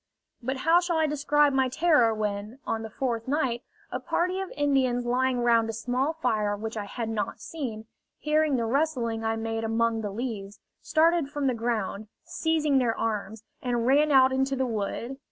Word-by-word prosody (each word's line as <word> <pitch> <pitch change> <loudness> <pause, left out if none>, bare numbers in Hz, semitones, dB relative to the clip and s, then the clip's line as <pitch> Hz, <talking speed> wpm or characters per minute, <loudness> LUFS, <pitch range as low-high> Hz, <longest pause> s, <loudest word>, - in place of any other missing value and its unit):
But 260 +3 -2
how 330 +6 +4
shall 350 -2 -1
I 320 - +3
describe 295 -1 +2
my 265 -1 +2
terror 290 -5 +4
when, 210 +1 -3
on 225 - -2
the 220 - -6
fourth 235 -1 -3
night, 265 -4 0 0.3
a - - -2
party 365 +2 -1
of 385 -1 -4
Indians 265 -4 +1
lying 250 +1 +1
round 230 -1 +3
a - - -2
small 250 +6 -1
fire 215 -9 0
which 220 +2 -5
I 210 -2 -3
had 230 +3 -4
not 215 -3 -3
seen, 235 -9 -6 0.3
hearing 305 -1 +1
the 235 -2 0
rustling 240 -4 0
I 225 0 0
made 225 0 -3
among 225 0 +1
the 210 - -3
leaves, 205 -2 -5 0.2
started 330 -2 +2
from 290 -1 -3
the 260 - +2
ground, 220 -3 -2 0.2
seizing 320 -5 +1
their 235 -3 0
arms, 220 -1 -3 0.2
and 240 -2 -1
ran 290 +4 +4
out 265 -1 +6
into 265 +1 0
the 265 0 0
wood? 230 +3 -3
245 Hz, 185 wpm, -27 LUFS, 225-290 Hz, 0.3 s, out